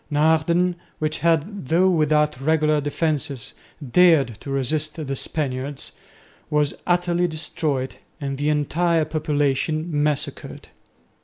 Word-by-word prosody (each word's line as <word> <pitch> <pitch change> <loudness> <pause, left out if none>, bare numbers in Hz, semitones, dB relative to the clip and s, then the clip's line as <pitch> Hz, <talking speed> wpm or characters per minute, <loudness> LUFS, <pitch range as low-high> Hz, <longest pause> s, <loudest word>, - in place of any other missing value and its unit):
Naarden, 160 +4 +2 0.2
which 155 0 -2
had, 170 +1 0
though 170 +5 +4
without 150 -5 +2
regular 155 0 +2
defences, 145 -3 -2 0.4
dared 165 -7 +5
to - - -9
resist 145 +3 0
the 140 -4 -4
Spaniards, 135 -1 -3 0.6
was 150 -1 +1
utterly 175 0 +2
destroyed 155 -4 -3 0.2
and 135 -2 -4
the 145 +1 +1
entire 160 +2 +1
population 155 0 0
massacred. 150 -1 -2
155 Hz, 105 wpm, -23 LUFS, 145-165 Hz, 0.6 s, dared